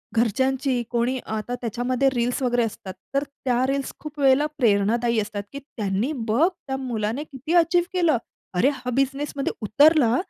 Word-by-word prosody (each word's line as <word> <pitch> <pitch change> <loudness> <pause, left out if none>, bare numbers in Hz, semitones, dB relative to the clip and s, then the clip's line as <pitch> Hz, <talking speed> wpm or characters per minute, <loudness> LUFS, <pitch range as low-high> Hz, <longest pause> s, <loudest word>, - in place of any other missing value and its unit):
घरच्यांची 260 +3 +1
कोणी 240 +2 +1
आता 220 +3 -3
त्याच्यामध्ये 245 +3 0
रील्स 245 +2 0
वगैरे 245 -1 +2
असतात 200 -3 -5 0.2
तर 275 - +2
त्या 260 -3 -1
रील्स 275 0 -2
खूप 305 -1 -9
वेळेला 275 +1 +4
प्रेरणादायी 230 +1 +2
असतात, 205 -1 -3
की 280 - -5
त्यांनी 220 -2 -2 0.2
बघ 245 +11 +4
त्या 295 -8 -6
मुलाने 240 +1 -2
किती 290 +2 -5
अचीव्ह 345 +1 +4
केलं. 340 -8 +3 0.4
अरे 180 +10 +3
हा 250 -1 -6
बिझनेसमध्ये 275 +1 -1
उतरला 260 +3 +4
255 Hz, 150 wpm, -24 LUFS, 230-280 Hz, 0.4 s, वेळेला